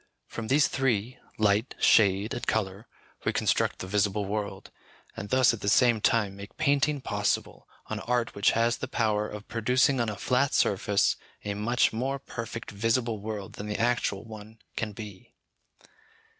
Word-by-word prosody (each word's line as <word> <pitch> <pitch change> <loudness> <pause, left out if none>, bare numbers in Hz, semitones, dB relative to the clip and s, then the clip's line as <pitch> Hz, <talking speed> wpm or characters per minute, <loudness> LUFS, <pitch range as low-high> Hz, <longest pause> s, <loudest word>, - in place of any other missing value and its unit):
From 115 -1 -6
these 140 +3 +4
three, 125 -2 -1 0.2
light, 105 +3 +1
shade, 100 0 +4
and 120 - -5
colour, 100 0 -1 0.4
we - - +1
construct - - +1
the - - -6
visible 105 +1 +1
world, 100 -1 -4 0.4
and 105 -3 -6
thus, 130 -2 +4
at 110 - -6
the 100 - 0
same 120 0 +4
time, 105 -5 +2
make 100 +1 -11
painting 145 -1 +2
possible, - - -2 0.2
an - - -4
art 120 0 -1
which 100 - +2
has 115 +1 +2
the 130 - -5
power 105 -3 0
of 105 0 -9
producing 125 +4 +2
on 115 - 0
a 105 - -4
flat 130 +6 +1
surface 100 0 +2 0.3
a 100 - -1
much 110 +4 +1
more 130 +5 -1
perfect 115 -4 -7
visible 115 +2 0
world 105 -1 -6
than 105 - -7
the 105 - -2
actual 120 -4 0
one 110 0 -11 0.2
can 110 -2 -2
be. 105 -2 -10
110 Hz, 165 wpm, -28 LUFS, 105-125 Hz, 0.4 s, these